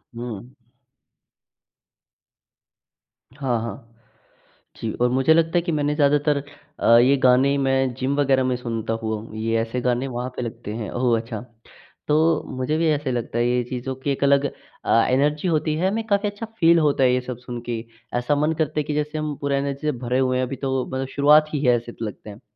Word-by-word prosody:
हुँ। 120 0 -7 2.8
हाँ, 130 -4 -1
हाँ। 115 0 -7 0.9
जी, 110 - -3
और 125 0 +1
मुझे 135 +5 +4
लगता 165 0 +2
है - - +3
कि 170 0 -3
मैंने 150 -1 0
ज़्यादातर 145 0 +3 0.4
अ, 115 - +6
ये 130 +3 +5
गाने 130 +2 +4
मैं 135 -2 +1
जिम 135 +3 -1
वगैरह 135 -2 +3
में 130 -1 0
सुनता 115 -2 -3
हुआ 110 0 -1
हूँ, 110 -1 -11
ये 115 +1 0
ऐसे 115 +2 -3
गाने 125 +2 0
वहाँ 125 0 -4
पे - - -2
लगते 115 -3 -6
हैं 110 -4 -4
ओह! 120 -2 +1
अच्छा। 115 -2 -6 0.7
तो 155 +2 +3
मुझे 130 +5 0
भी 165 0 +1
ऐसे 145 -3 -1
लगता 120 -1 -3
है 120 - +2
ये 125 0 +1
चीज़ों 130 +1 -4
की 135 +2 -3
एक 140 - -2
अलग 140 0 +4 0.4
अ, 115 - +4
एनर्जी 150 +6 +1
होती 155 -2 +1
है, 180 +4 +1
हमें 225 +3 -2
काफ़ी 205 0 +1
अच्छा 205 +3 -7
फ़ील 170 0 +5
होता 145 -3 +2
है 125 -1 +4
ये 125 - +1
सब 125 -1 -6
सुन 125 -1 -7
के 115 -1 -1 0.4
ऐसा 125 +4 +1
मन 150 +2 +1
करता 155 -1 -1
है - - 0
कि 150 +1 -4
जैसे 150 +1 -2
हम 155 -1 -3
पूरा 140 -1 0
एनर्जी 140 0 -2
से - - +3
भरे 125 +1 0
हुए 130 -1 +1
हैं 130 - +1
अभी 135 +2 -5
तो 130 0 -2
मतलब 130 0 -3
शुरुआत 150 +2 +6
ही 145 - -1
है 125 - +5
ऐसे 120 0 -9
लगते 110 -1 -6
हैं। 105 +1 -11
130 Hz, 205 wpm, -23 LUFS, 120-150 Hz, 2.8 s, अ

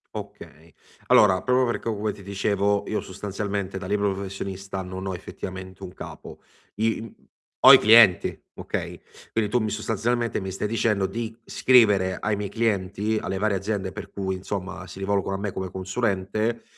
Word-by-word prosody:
Okay. 80 0 -10 0.3
Allora 95 -3 +5
proprio 125 0 +3
perché 120 -1 -2
come 105 +1 -2
ti 100 - -13
dicevo 100 +1 0
io 110 - -1
sostanzialmente 100 0 -4
da 95 - -6
libero 100 0 +1
professionista 95 0 -5
non 95 +1 -6
ho 95 - -2
effettivamente 95 +1 -8
un 90 -1 -8
capo. - - -10 0.4
I 110 +2 0
mhmm, 115 -2 -13 0.3
ho - - +11
i - - +11
clienti, 110 -4 +6
okay, - - -5 0.3
quindi 110 -2 0
tu 125 - +3
mi 110 -2 -1
sostanzialmente 115 +3 -1
mi 95 -1 -5
stai 95 +2 -3
dicendo 105 -3 +1
di 115 +1 -5
scrivere 105 -7 +4
ai 105 -1 -1
miei 105 0 -3
clienti, 105 -1 0
alle 95 - -3
varie 100 0 +1
aziende 95 -1 -3
per 105 +2 -8
cui 95 -1 -3
insomma 95 0 -5
si 90 - -11
rivolgono 95 0 -1
a - - -4
me 100 0 -3
come 95 0 -4
consulente, 100 +3 -2
100 Hz, 170 wpm, -25 LUFS, 95-110 Hz, 0.4 s, ho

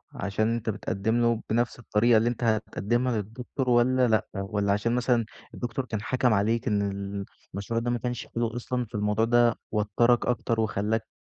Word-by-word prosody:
عشان 110 +3 0
أنت 115 -1 -3
بتقدِّم 110 +2 -1
له 115 -1 +2
بنفس 120 +2 0
الطريقة 115 0 +3
اللي 115 +2 +3
أنت 120 0 -4
هتقدمها 115 +2 0
للدكتور 120 +5 -4
والّا 125 +1 +4
لأ، 110 -2 +2
والّا 100 +1 0
عشان 115 +4 0
مثلًا 125 -2 +2 0.3
الدكتور 120 +2 -3
كان 110 -4 -4
حَكَم 125 +1 +1
عليك 110 +4 +1
إن 105 -3 +2
ال 100 0 -5 0.3
المشروع 100 +4 -2
ده 120 +1 -1
ما 120 - +1
كانش 120 0 -4
حلو 115 0 -1
أصلًا، 125 0 -2
فالموضوع 105 +1 0
ده 120 0 +4 0.2
وتّرك 110 +3 +2
أكتر 115 -2 0
وخلّاك 110 +1 0
115 Hz, 170 wpm, -27 LUFS, 105-120 Hz, 0.3 s, والّا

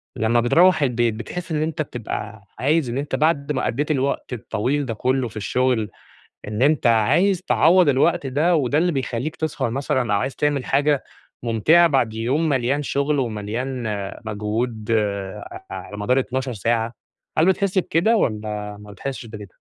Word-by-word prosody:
لمَّا 115 +2 +2
بترُوح 165 +8 +4
البيت، 120 -3 +1
بتحس 160 +11 -6
إن 155 -1 0
أنتَ 155 0 -2
بتبقى 110 -5 -6 0.2
عايِز 145 0 +2
إن 120 - -3
أنتَ 145 +1 -2
بعد 150 -2 +1
ما 130 - -1
قضَّيت 145 +6 -1
الوقت 135 -2 -1
الطويل 125 +5 -1
ده 115 - -3
كله 130 +3 0
في 110 -1 -10
الشغل، 120 +1 0 0.6
إن 105 +3 -3
أنتَ 145 -3 +3
عايِز 170 - +3
تعوّض 175 -1 +4
الوقت 145 +3 +2
ده، 155 +7 +2
وده 140 -1 +1
اللي 175 +2 +2
بيخلِّيك 135 +1 -3
تسهر 150 -5 -2
مثلًا 130 -3 -1
أو 100 - +2
عايِز 130 +4 -3
تعمل 145 -3 0
حاجة 145 0 +2 0.4
ممتعة 120 +10 +4
بعد 130 -7 +1
يوم 130 +9 0
مليان 135 +2 +1
شغل 140 +1 0
ومليان 120 +2 -3 0.4
مجهود 110 +1 -3
ع 100 -3 -2
على 95 +2 -7
مدار 125 +6 +2
12 130 0 -2
ساعة؟ 115 +2 -1 0.4
هل 160 - +5
بتحس 190 +1 +1
بكده، 185 +5 +2
والّا 105 - -2
ما 105 0 -11
بتحسّش 130 +5 -6
بكده؟ 105 -4 -10
130 Hz, 160 wpm, -22 LUFS, 110-150 Hz, 0.6 s, هل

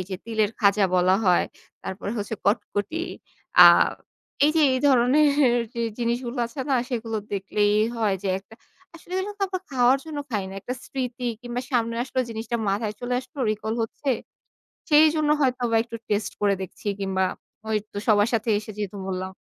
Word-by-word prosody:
এই 185 - -3
যে 185 - -2
তিলের 220 -2 0
খাজা 200 -1 +4
বলা 180 +1 +4
হয়। 180 -1 +4 0.4
তারপরে 195 +2 -5
হচ্ছে 205 +2 -3
কটকটি। 205 - -1 0.6
আ - - +12 0.8
এই 300 - +5
যে - - +5
এই 255 - 0
ধরনের 270 0 +4 0.2
যে 235 - -3 0.2
জিনিসগুলো 240 +1 -2
আছে 270 +3 -7
না - - +4
সেগুলো 225 -3 -3 0.2
দেখলেই 205 +1 +1 0.2
হয় 215 -3 +1
যে 195 - -2
একটা 200 +3 -17 0.4
আসলে 340 +2 -13
এগুলোতো 405 +1 -4
আমরা 370 -1 -4
খাওয়ার 255 +1 +4
জন্য 310 -2 -6
খাই 205 -4 -1
না। 190 - -9
একটা 250 +6 -4
স্মৃতি 250 -2 -4
কিংবা 245 0 -4
সামনে 230 -2 +1
আসলে 260 -1 -1
জিনিসটা 225 +1 -3
মাথায় 210 +2 -1
চলে 245 0 -2
আসলো 275 +1 -10
রিকল 215 +1 -3
হচ্ছে। 270 +5 -3 0.8
সেইজন্য 310 0 +5
হয়তো 255 -2 +1
বা - - +3
একটু 230 0 -8
টেস্ট 205 0 0
করে 205 -1 +3
দেখছি 190 +2 -8
কিংবা 190 -1 0 0.5
ওইতো 215 -1 -3
সবার 205 -1 +4
সাথে 225 0 0
এসে 215 0 -9
যেহেতু 205 -1 -4
বললাম 185 0 -3
230 Hz, 170 wpm, -24 LUFS, 205-260 Hz, 0.8 s, আ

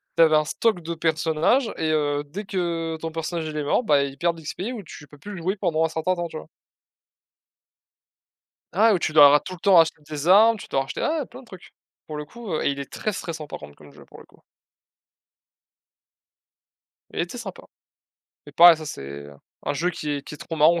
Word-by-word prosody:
tu - - +3
avais 155 -1 +5
un 155 0 +3
stock 215 +3 0
de 170 +1 -4
personnages 160 - +1
et 160 - -1
heu, 145 -1 0
dès 170 +9 -7
que 170 -4 -2
ton 165 0 -4
personnage 165 0 -4
il 155 -1 -5
est 150 - -1
mort, 145 - +1
bah, 145 -10 +3
il 140 -1 -5
perd 170 0 +1
de - - -11
l'XP 155 - -6
ou 215 - -7
tu 150 -3 -12
peux 145 - -16
plus 205 +9 -10
le 180 - -7
jouer 185 +4 -1
pendant 165 -5 0
un - - -1
certain 160 +3 -1
temps. 175 -1 -3
Tu 160 - -8
vois? - - -10 2.2
Ah 220 +5 +4
ouais, 190 - +2
tu 160 - -2
dois 145 -2 +9
ra 145 +1 +5
tout 185 - -8
le - - -12
temps 195 -1 +5
racheter 160 -2 +4
des 150 +1 -4
armes. 220 +4 +6
Tu - - -11
dois 135 - 0
racheter 135 - -6
ah 315 0 0
ouais, 275 - -4
plein - - -12
de 260 - -18
trucs 185 -5 -14 0.3
pour 155 - -7
le 150 - -5
coup, 225 +4 -9
heu, - - -1
et - - +2
il 140 - -4
est 140 - -7
très 215 - -2
stressant 160 -4 -6
par 145 - -7
contre 75 -1 -12
comme 75 -1 -16
jeu - - -16
pour - - -16
le - - -14
coup. - - -25 2.7
Il - - -3
était - - -4
sympa, - - -8 0.8
mais 145 - -12
pareil 170 +2 +8
ça 155 - -8
c'est 70 - -7 0.4
un - - -1
jeu 165 +5 -1
qui 155 -3 -5
est 145 -1 -2
qui - - -8
est - - -12
trop 165 - -6
marrant 160 +3 +5
160 Hz, 235 wpm, -24 LUFS, 150-180 Hz, 2.7 s, dois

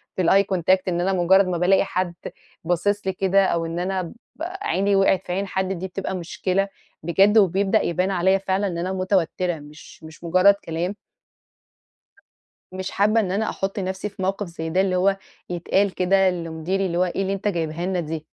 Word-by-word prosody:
في 185 - 0
الeye 195 +2 +3
contact 185 +2 +3
إن 175 -1 0
أنا 190 +2 +1
مجرد 190 +2 +4
ما 180 -1 -1
بالاقي 185 +3 +3
حد 185 -2 -2 0.5
باصص 190 +4 0
لي 190 - +1
كده، 195 +1 +2
أو 170 -2 0
إن 165 +1 -4
أنا 185 +1 -1
ب 170 - -7 0.3
عيني 350 - -1
وقعِت 195 -1 +2
في - - -4
عين 195 +2 -2
حد 190 0 -1
دي 185 +1 -5
بتبقى 190 0 -4
مشكلة، 185 +3 -1 0.4
بجد 195 +6 +4
وبيبدأ 195 -1 +3
يبان 180 +3 0
عليّا 190 +1 +3
فعلًا 195 +1 -1
إن 170 -2 -4
أنا 185 +2 -2
متوترة، 185 -2 0
مش 150 +2 -14
مش 160 +1 -13
مجرد 185 +4 +5
كلام. 170 +4 -3 1.8
مش 190 0 -5
حابة 215 +3 +2
إن 190 -4 -2
أنا 215 +3 0
أحط 195 +1 -3
نفسي 190 +2 -3
في 200 -1 -9
موقف 195 +2 -1
زي 160 -1 -6
ده، 185 +3 +2
اللي 190 -1 +1
هو 195 +2 +2 0.3
يتقال 190 +3 0
كده 190 +1 +3
لمديري 170 +2 -2
اللي 175 -1 -2
هو 180 - +4
إيه 185 +2 -2
اللي 195 0 -1
أنت 195 +1 -2
جايبها 170 -2 -2
لنا 185 -1 0
دي، 160 -1 -5
185 Hz, 190 wpm, -23 LUFS, 175-195 Hz, 1.8 s, مجرد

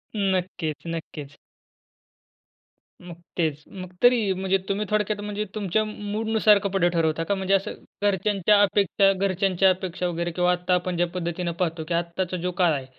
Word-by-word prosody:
नक्कीच, 180 -5 -2
नक्कीच. 155 -3 -7 1.7
मग 175 -2 -10 0.2
तेच. 155 -3 -1
मग 185 -1 -9
तरी, 235 -5 +4
म्हणजे 190 +1 0
तुम्ही 200 +2 -1
थोडक्यात 210 -1 0
म्हणजे 210 0 -3
तुमच्या 215 0 0
म 215 - -5 0.2
मूडनुसार 220 0 +3
कपडे 195 -3 +1
ठरवता 165 -1 0
का? 200 +5 0
म्हणजे 190 0 -1
असं 195 0 +1 0.3
घरच्यांच्या 205 0 +2
अपेक्षा 200 -1 +3
घरच्यांच्या 190 0 +2
अपेक्षा 185 -1 -2
वगैरे 170 0 -2
किंवा 180 +1 +2
आत्ता 180 0 0
आपण 180 0 0
ज्या 175 +1 +2
पद्धतीनं 175 0 -2
पाहतो 165 -2 -1
की 175 - -2
आत्ताचा 170 +2 -2
जो 180 +1 -2
काळ 175 -3 +4
आहे, 135 -3 -3
185 Hz, 155 wpm, -24 LUFS, 170-200 Hz, 1.7 s, तरी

